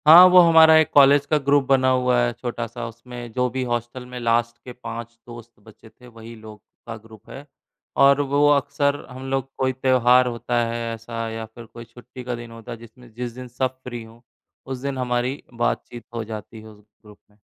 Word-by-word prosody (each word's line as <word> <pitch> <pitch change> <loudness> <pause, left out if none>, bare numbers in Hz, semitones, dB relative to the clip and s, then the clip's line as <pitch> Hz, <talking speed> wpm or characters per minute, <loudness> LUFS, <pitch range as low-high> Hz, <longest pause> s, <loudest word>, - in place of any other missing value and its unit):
हाँ, 165 +4 +11
वो 180 0 +7
हमारा 160 -2 +7
एक 160 -1 +3
कॉलेज 140 0 +6
का 155 - +4
ग्रुप 140 0 +2
बना 130 -1 +3
हुआ 125 -1 +2
है 120 0 +1
छोटा-सा, 120 0 -6
उसमें 120 +1 -10
जो 125 +1 0
भी 130 +1 -3
हॉस्टल 120 +1 -4
में 125 0 -8
लास्ट 115 0 0
के 125 - -9
5 115 -1 -8
दोस्त 120 -1 -11
बचे 110 +1 -17
थे, 125 +3 -19
वही 115 -1 -12
लोग 110 -1 -13 0.3
का 115 - -6
ग्रुप 110 +1 -17
है। 140 +2 -10 0.6
और 140 +1 +5
वो 145 +1 +2
अक्सर 140 0 +1
हम 130 +1 -8
लोग 135 0 -2
कोई 130 0 0
त्योहार 125 -1 +3
होता 120 0 -1
है 115 0 -4
ऐसा 115 0 -6
या 110 0 -6
फिर 115 +1 -13
कोई 115 +1 -12
छुट्टी 120 +2 -13
का 125 0 -4
दिन 120 0 -10
होता 115 -1 -11
है, - - -6
जिसमें 115 +1 -16
जिस 120 +1 -5
दिन 125 +1 -9
सब 130 +1 -3
फ्री 120 -2 -7
हों, 115 +1 -16 0.5
उस 130 -1 -5
दिन 140 0 -4
हमारी 125 +2 -2
बातचीत 120 0 -3
हो 115 - -3
जाती 110 0 -9
है 110 - -13
उस 105 -1 -16 0.2
ग्रुप 105 -1 -16
में 105 - -29
120 Hz, 210 wpm, -22 LUFS, 115-130 Hz, 0.6 s, हाँ